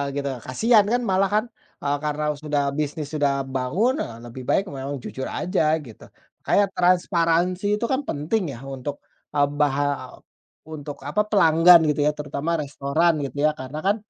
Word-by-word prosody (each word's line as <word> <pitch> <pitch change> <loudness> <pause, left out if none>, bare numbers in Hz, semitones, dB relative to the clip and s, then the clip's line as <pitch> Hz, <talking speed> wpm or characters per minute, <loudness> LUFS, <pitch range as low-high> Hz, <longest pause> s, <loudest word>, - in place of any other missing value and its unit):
gitu, 140 -1 -2 0.2
kasihan 215 - +4
kan 245 - +2
malah 190 +1 +2
kan, 215 +2 +2 0.4
eee, 145 0 +1
karena 150 0 -1 0.2
sudah 150 -1 0 0.2
bisnis 150 0 -2
sudah 145 -2 +2 0.2
bangun, 180 - +1
eee, 115 -1 -6
lebih 120 +2 -8
baik 195 - +3
memang 140 +2 -4
jujur 130 - -5
aja 180 +2 -1 0.2
gitu. 110 - -13 0.4
Kayak 205 0 +3
transparansi 175 0 +2
itu 235 - -2
kan 265 +2 +1
penting 160 +9 -1
ya, 115 - -9
untuk, 135 +1 -5 0.4
eee, 145 0 +4
baha 145 0 0 0.6
untuk 145 -1 -7
apa 150 +9 +1
pelanggan 170 -3 +7
gitu 150 -1 +1
ya, - - +4
terutama 150 +3 -2
restoran 145 +4 +1
gitu 140 0 -5
ya. 155 - +3
Karena 135 0 -8
kan, 200 +2 +3
150 Hz, 160 wpm, -23 LUFS, 140-180 Hz, 0.6 s, pelanggan